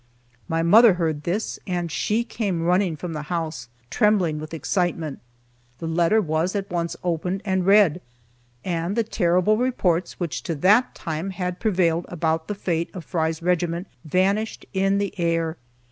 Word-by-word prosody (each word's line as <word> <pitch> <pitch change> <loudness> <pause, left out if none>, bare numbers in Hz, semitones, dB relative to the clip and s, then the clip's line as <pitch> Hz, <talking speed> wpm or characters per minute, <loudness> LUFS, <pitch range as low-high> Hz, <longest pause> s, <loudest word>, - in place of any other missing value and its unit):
My 165 -1 0
mother 215 +4 +7
heard 160 -4 -2
this, 195 +6 -2
and 175 -3 -2
she 220 +8 0
came 200 -8 -2
running 180 0 +2
from 165 +2 -6
the 150 - -4
house, 160 -8 -3 0.2
trembling 195 -8 +2
with 155 0 -8
excitement. 165 -1 -2 0.6
The 165 - -6
letter 170 +6 +3
was 165 0 0
at 200 -2 -3
once 170 -1 -2
opened 180 +3 -2
and 190 -2 0
read, 195 -4 +5 0.6
and 175 +2 -1
the 230 - +2
terrible 185 0 +2
reports 190 -8 0
which 170 -5 -3
to 165 - -3
that 205 - +3
time 160 +3 -4
had 180 -1 -4
prevailed 175 -6 +1
about 160 -1 -1
the 210 - -3
fate 170 -4 -1
of 180 - -7
Fry's 160 -1 -1
regiment 175 0 0 0.2
vanished 195 +7 0
in 195 +1 +2
the 200 0 -1
air. 165 -1 0
175 Hz, 160 wpm, -23 LUFS, 165-195 Hz, 0.6 s, mother